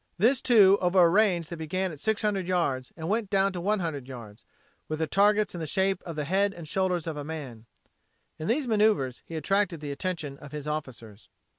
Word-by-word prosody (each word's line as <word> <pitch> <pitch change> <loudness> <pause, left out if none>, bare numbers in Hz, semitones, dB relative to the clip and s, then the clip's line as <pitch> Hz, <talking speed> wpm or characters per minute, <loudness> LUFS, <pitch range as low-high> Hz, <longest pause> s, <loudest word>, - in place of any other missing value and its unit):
This, 245 +8 +3
too, 200 -5 +6
over 180 +1 +3
a - - +7
range 180 -3 +2
that 170 - -6
began 185 +4 -2
at 150 - -10
600 210 -1 0
yards 140 -9 -1
and 160 -1 -5
went 210 +1 -1
down 195 -1 +2
to 175 - -4
100 170 -9 -1
yards, 115 -4 -10 0.4
with 155 - -3
the 160 - 0
targets 205 +6 +2
in 175 - -6
the 160 - -4
shape 190 +4 0
of 165 - -5
the 150 -1 -3
head 195 +5 +1
and 170 -2 -9
shoulders 180 0 0
of 160 -2 -4
a 145 - -4
man. 135 -8 -7 0.7
In 155 - -4
these 270 +5 +1
maneuvers 210 - +1
he 165 - -7
attracted 190 +2 0
the 145 -1 -5
attention 150 -2 -4
of 145 0 -12
his 150 -1 -6
officers. 120 -8 -6
170 Hz, 205 wpm, -27 LUFS, 150-195 Hz, 0.7 s, a